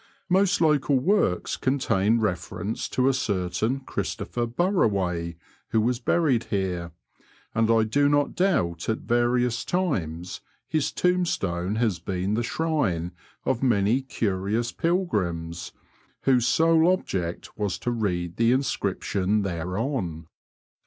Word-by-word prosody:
Most 190 Hz, +2 st, +3 dB
local 145 Hz, -3 st, +3 dB
works 135 Hz, -, +1 dB
contain 115 Hz, -5 st, +1 dB
reference 100 Hz, +2 st, -2 dB
to 130 Hz, 0 st, +1 dB
a 135 Hz, -, +4 dB
certain 110 Hz, +2 st, -1 dB
Christopher 120 Hz, -2 st, -3 dB
Barraway, 100 Hz, -, 0 dB, 0.3 s
who 110 Hz, -, +2 dB
was 120 Hz, +2 st, +1 dB
baried 135 Hz, -7 st, +2 dB
here, 90 Hz, -4 st, -2 dB, 0.6 s
and 115 Hz, 0 st, +2 dB
I 115 Hz, -1 st, +4 dB
do 145 Hz, +6 st, +2 dB
not 145 Hz, 0 st, +2 dB
doubt 90 Hz, -, 0 dB
at 110 Hz, -, +1 dB
various 120 Hz, 0 st, +1 dB
times 90 Hz, -, -2 dB, 0.3 s
his 155 Hz, -1 st, 0 dB
tombstone 105 Hz, -, 0 dB
has 110 Hz, -7 st, 0 dB
been 95 Hz, +3 st, -2 dB
the 115 Hz, -, +1 dB
shrine 120 Hz, -, -1 dB, 0.3 s
of 115 Hz, -, 0 dB
many 115 Hz, 0 st, +2 dB
curious 110 Hz, -1 st, -1 dB
pilgrims 95 Hz, -, -1 dB, 0.5 s
whose 125 Hz, -3 st, +3 dB
sole 165 Hz, +3 st, +4 dB
object 90 Hz, -, -3 dB
was 100 Hz, -5 st, -2 dB
to 120 Hz, -, -2 dB
read 90 Hz, -7 st, -2 dB
the 115 Hz, +1 st, +4 dB
inscription 105 Hz, -5 st, 0 dB
thereon. 90 Hz, -, -3 dB
115 Hz, 120 wpm, -25 LUFS, 90-135 Hz, 0.6 s, a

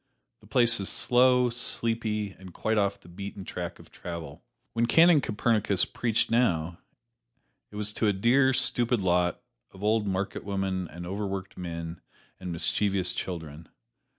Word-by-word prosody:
The -, -, -19 dB
place 120 Hz, -2 st, +4 dB
is 95 Hz, -, +1 dB
slow, 125 Hz, 0 st, +4 dB
sleepy, 115 Hz, -3 st, -1 dB
and 95 Hz, -1 st, -14 dB
quite 110 Hz, -1 st, 0 dB
off 100 Hz, 0 st, 0 dB
the 95 Hz, -, -19 dB
beaten 100 Hz, +2 st, -8 dB
track 90 Hz, -1 st, -5 dB
of -, -, -17 dB
travel. 85 Hz, -5 st, -8 dB, 0.3 s
When 115 Hz, 0 st, +1 dB
Canon 165 Hz, +1 st, +6 dB
Copernicus 105 Hz, -4 st, +1 dB
preached 115 Hz, -2 st, -1 dB
now, 85 Hz, -8 st, +1 dB, 0.9 s
it -, -, -14 dB
was 105 Hz, 0 st, -3 dB
to 110 Hz, -, +1 dB
a -, -, +4 dB
dear, 120 Hz, +7 st, +3 dB
stupid 120 Hz, -2 st, +2 dB
lot 90 Hz, -2 st, +1 dB, 0.3 s
of 95 Hz, -, -13 dB
old 105 Hz, 0 st, +2 dB
marketwomen 95 Hz, -1 st, -2 dB
and 85 Hz, +1 st, -9 dB
overworked 95 Hz, 0 st, -4 dB
men 85 Hz, -1 st, -6 dB, 0.4 s
and 90 Hz, -1 st, -5 dB
mischievous 95 Hz, +2 st, 0 dB
children. 80 Hz, -3 st, -6 dB
100 Hz, 145 wpm, -28 LUFS, 90-115 Hz, 0.9 s, Canon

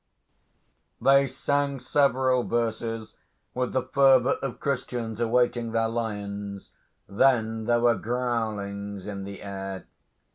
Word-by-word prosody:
They 140 Hz, 0 st, +5 dB
sang 140 Hz, +1 st, -1 dB
several 130 Hz, -1 st, +2 dB
verses 115 Hz, -1 st, -2 dB, 0.4 s
with 125 Hz, 0 st, -1 dB
the 130 Hz, -, 0 dB
fervour 135 Hz, -1 st, +4 dB
of 135 Hz, -3 st, -4 dB
Christians 125 Hz, -5 st, -3 dB
awaiting 120 Hz, 0 st, +1 dB
their 115 Hz, 0 st, +1 dB
lions. 100 Hz, -3 st, -4 dB, 0.4 s
Then 110 Hz, 0 st, +2 dB
there 120 Hz, 0 st, +2 dB
were 120 Hz, 0 st, +5 dB
growlings 105 Hz, -4 st, -3 dB
in 100 Hz, -2 st, -5 dB
the 100 Hz, 0 st, -8 dB
air. 95 Hz, -1 st, -6 dB
115 Hz, 110 wpm, -26 LUFS, 105-130 Hz, 0.4 s, They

